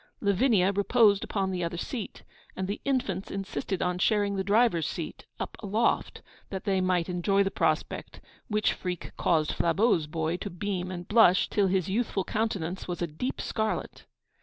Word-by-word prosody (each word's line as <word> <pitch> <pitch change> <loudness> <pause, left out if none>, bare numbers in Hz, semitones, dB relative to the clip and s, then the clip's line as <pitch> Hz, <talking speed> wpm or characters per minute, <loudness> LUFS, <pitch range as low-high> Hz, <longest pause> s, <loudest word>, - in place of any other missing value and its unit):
Lavinia 200 -1 +3
reposed 205 0 +4
upon 195 -2 -1
the 180 -1 -2
other 170 0 -3
seat; 220 +4 -5 0.3
and 190 - -3
the 200 +2 -4
infants 245 -9 -1
insisted 195 0 -3
on 180 0 -1
sharing 205 0 +2
the 190 - -1
driver's 205 -5 +3
seat, 165 - -6
up - - -4
aloft, 215 +3 0 0.3
that 190 -1 -5
they 190 -2 +1
might 180 -2 +1
enjoy 190 +2 +2
the 195 - -1
prospect, 155 -3 -1 0.3
which 210 -1 +1
freak 180 -1 -5
caused 155 -3 +2
Flabeau's 170 -2 +2
boy 160 +2 -1
to 200 - -5
beam 185 0 -3
and 175 -1 -6
blush 205 -4 +5
till 205 -2 +3
his 185 -2 +1
youthful 200 -1 0
countenance 190 -5 -2
was 175 -1 -3
a - - +2
deep 170 - -4
scarlet. 220 -1 -3
190 Hz, 165 wpm, -28 LUFS, 175-210 Hz, 0.3 s, blush